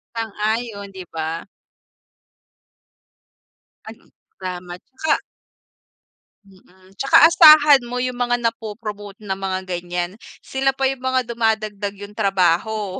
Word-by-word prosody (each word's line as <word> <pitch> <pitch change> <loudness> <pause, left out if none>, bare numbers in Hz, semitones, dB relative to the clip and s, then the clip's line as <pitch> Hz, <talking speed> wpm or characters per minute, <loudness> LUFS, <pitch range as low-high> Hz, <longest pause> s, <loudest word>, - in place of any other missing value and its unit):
Sang-ayon 220 -1 -3
'di 190 -1 -8
ba? 160 +3 -4 2.4
At 220 +1 -9 0.5
lamat. 180 -1 -7 0.2
Tsaka 315 - +1 1.3
Mm, 190 0 -22
tsaka 275 +4 +6
asahan 305 -4 +7
mo 245 +1 -4
yung 250 0 -3
mga 245 0 +1
na-popromote 215 -3 -5
ng 190 -1 -3
mga 190 -1 -2
ganyan, 175 0 -4 0.3
sila 270 0 0
pa 270 - -1
yung 265 -1 -1
mga 260 -1 0
dumadagdag 215 -3 -1
yung 205 +1 -10
trabaho. 195 0 0
210 Hz, 105 wpm, -20 LUFS, 190-245 Hz, 2.4 s, asahan